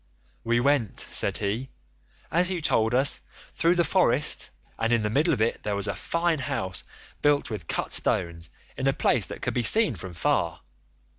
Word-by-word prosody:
"'We 120 +1 +1
went,' 140 -6 0
said - - +1
he, 110 +6 -3 0.6
'as 175 +2 +4
you 185 -2 -2
told 115 -6 +1
us, 135 +2 +2 0.3
through 170 +2 +2
the 175 - +3
forest, 150 -5 +2 0.3
and 115 +1 0
in 115 -2 +2
the 105 - -1
middle 150 +8 +2
of 125 -8 +1
it 115 - -1
there 105 - -2
was 100 +1 -2
a - - -1
fine 170 -2 -1
house 95 -7 -3 0.4
built 145 -3 +2
with 95 -7 -6
cut - - -2
stones 85 -1 +1 0.3
in - - -2
a - - +3
place - - +1
that - - -8
could - - -1
be 125 - 0
seen 215 - +4
from 95 -2 -8
far. 85 - 0
120 Hz, 190 wpm, -26 LUFS, 105-150 Hz, 0.6 s, as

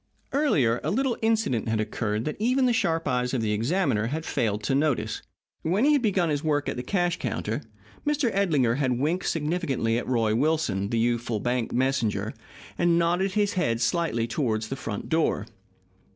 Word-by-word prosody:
Earlier, 140 - +2
a - - -1
little 255 +2 +1
incident 220 - +1
had 110 -1 0
occurred 110 0 -2
that 150 - -2
even 255 +4 +2
the 245 - +3
sharp 165 -6 0
eyes 125 +1 0
of 120 - 0
the 105 - 0
examiner 115 - +1
had 155 +6 -3
failed 105 -2 -1
to 135 - 0
notice. 145 -1 0 0.4
When 190 +10 +1
he 300 - +5
had 285 - +3
begun 190 -7 +1
his 145 -1 -1
work 145 -2 0
at - - -2
the 125 - -3
cash 175 +4 0
counter, - - -2 0.4
Mr. 295 -6 +1
Edlinger 145 -12 +2
had 130 -4 +1
winked 160 +8 0
significantly 150 -8 0
at - - -6
Roy 115 -4 +1
Wilson, 130 -7 +1
the 115 - 0
youthful 120 -1 0
bank 120 +1 -1
messenger, 130 -4 0 0.5
and 170 -1 +3
nodded 175 +3 +1
his 205 0 +1
head 115 - 0
slightly 120 -3 +1
toward 115 -3 -1
the 110 +5 -4
front 110 -5 -5
door. 160 0 +1
145 Hz, 180 wpm, -26 LUFS, 115-180 Hz, 0.5 s, he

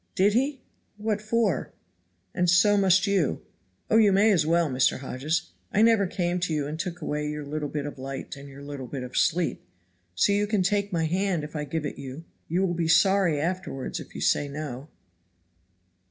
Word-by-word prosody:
"Did 200 +2 +3
he? 265 +3 0 0.4
what 210 -1 -1
for?" 215 -3 0 0.6
"And 180 0 +1
so 195 +4 +5
must 190 -2 +4
you. 190 - 0 0.4
Oh, 220 - +4
you 215 -3 +6
may 205 +3 +5
as 160 -6 +2
well, 170 0 +3
Mr. 130 -2 +2
Hodges. 130 - -3 0.2
I 210 - +3
never 225 -4 +4
came 175 0 -1
to 175 -2 -1
you 145 -2 -1
and 155 +2 -5
took 175 -1 -4
away 150 0 -2
your 150 0 -4
little 150 0 -3
bit 145 -1 -3
of 145 -2 -7
light 135 +2 -6
and 140 0 -11
your 140 +1 -11
little 140 -3 -7
bit 130 0 -5
of 125 0 -8
sleep. 175 0 +1 0.5
So 95 - +3
you 205 +1 +2
can 205 -3 +1
take 200 +1 0
my 165 -3 0
hand 180 0 0
if 150 +1 -8
I 150 -1 -2
can - - -17
give 160 -2 -1
it 145 - -5
you. 140 +4 -8 0.2
You 180 +4 +1
will 175 - -1
be 165 -1 -1
sorry 170 -1 +4
afterward 170 -5 -3
if - - -11
you - - -5
say 145 - +2
no." 140 -2 -6
170 Hz, 205 wpm, -26 LUFS, 145-195 Hz, 0.6 s, you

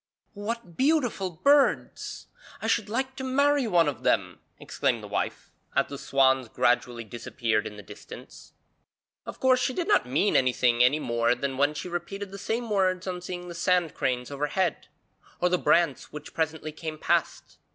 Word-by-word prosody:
'What 210 -3 -5
beautiful 260 -10 +1
birds! 280 - +1 0.3
I - - -6
should - - +1
like 260 +4 -2
to 265 - -5
marry 280 0 +2
one 170 -6 +4
of 135 -5 -3
them!' 95 -8 +1 0.2
exclaimed - - -1
the - - -7
wife, - - -3 0.2
as - - +3
the 140 - -7
swans 130 -3 +2
gradually 120 0 +1
disappeared 115 -1 -2
in 105 - -10
the 105 - -10
distance. - - -12 0.7
Of - - -7
course 255 -1 +4
she 255 +1 -1
did 350 - -2
not - - +3
mean 150 +11 +1
anything, 125 -2 +3
any 130 +4 +4
more 120 -4 +1
than 135 +2 -3
when 145 +3 +2
she 165 - -5
repeated 185 +3 -5
the 195 - -8
same 230 +4 -2
words 185 -2 +1
on 180 -1 -4
seeing 180 0 -6
the 175 - -7
sand 175 -1 +1
cranes 125 0 -2
overhead, 150 +5 -1 0.5
or 180 - +2
the 180 0 +1
brants 170 -6 +2
which 150 0 -9
presently 160 -1 -2
came 155 0 -6
past. - - -1
165 Hz, 170 wpm, -27 LUFS, 130-200 Hz, 0.7 s, one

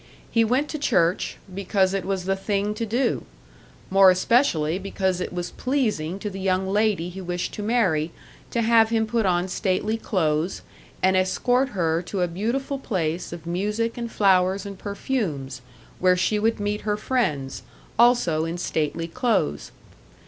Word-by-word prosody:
He 230 - +4
went 255 +6 +1
to 305 - -4
church, 175 - +1 0.2
because 190 0 +1
it 195 -2 -2
was 190 -2 -2
the 195 0 +1
thing 200 +1 -1
to 225 +1 -3
do; 240 +5 0 0.7
more 195 0 +7
especially 185 - +2
because 190 -2 -1
it - - -3
was 175 0 -4
pleasing 215 - -1
to 210 +1 -4
the 195 - -7
young 190 0 0
lady 205 -3 +1
he 190 +2 -8
wished 180 0 -3
to - - -5
marry 190 -8 +1 0.4
to 235 - 0
have 225 -1 +5
him 225 -1 +1
put 220 -2 0
on 175 0 +1
stately 200 +3 -1
clothes, 165 -5 -1 0.4
and 190 0 +4
escort 245 +8 +2
her 165 -1 +1
to 185 +1 -4
a 180 - +2
beautiful 235 +10 -2
place 175 -9 -2
of 170 -1 -8
music 210 +6 -1
and 235 -1 -5
flowers 190 0 +3
and 200 -1 -8
perfumes, 170 - -3 0.4
where 180 0 +4
she 210 +4 +1
would 225 +1 +1
meet 205 +1 -2
her 210 -1 -1
friends, 155 - -1 0.4
also 235 -10 +4
in 165 +1 -3
stately 165 -1 -2
clothes. 210 - -1
195 Hz, 165 wpm, -24 LUFS, 175-225 Hz, 0.7 s, more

